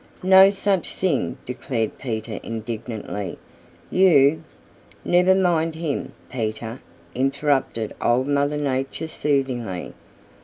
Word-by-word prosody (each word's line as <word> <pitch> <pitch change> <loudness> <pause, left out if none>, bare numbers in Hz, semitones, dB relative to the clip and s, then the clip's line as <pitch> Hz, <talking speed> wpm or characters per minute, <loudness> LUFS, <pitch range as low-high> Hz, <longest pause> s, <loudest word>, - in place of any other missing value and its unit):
"No 190 +1 +8
such 195 -3 0
thing!" 180 -8 0
declared 125 -3 -3
Peter 110 -3 -4
indignantly. 110 -3 -5 0.5
"You 160 -4 +5 0.3
" - - -30 0.3
"Never 180 +2 +4
mind 165 -4 +1
him, 160 -3 -3
Peter," 115 0 -4 0.3
interrupted 135 -4 0
Old 125 +2 +2
Mother 145 +1 +1
Nature 135 +2 -2
soothingly. 130 - -2
135 Hz, 100 wpm, -23 LUFS, 115-160 Hz, 0.5 s, No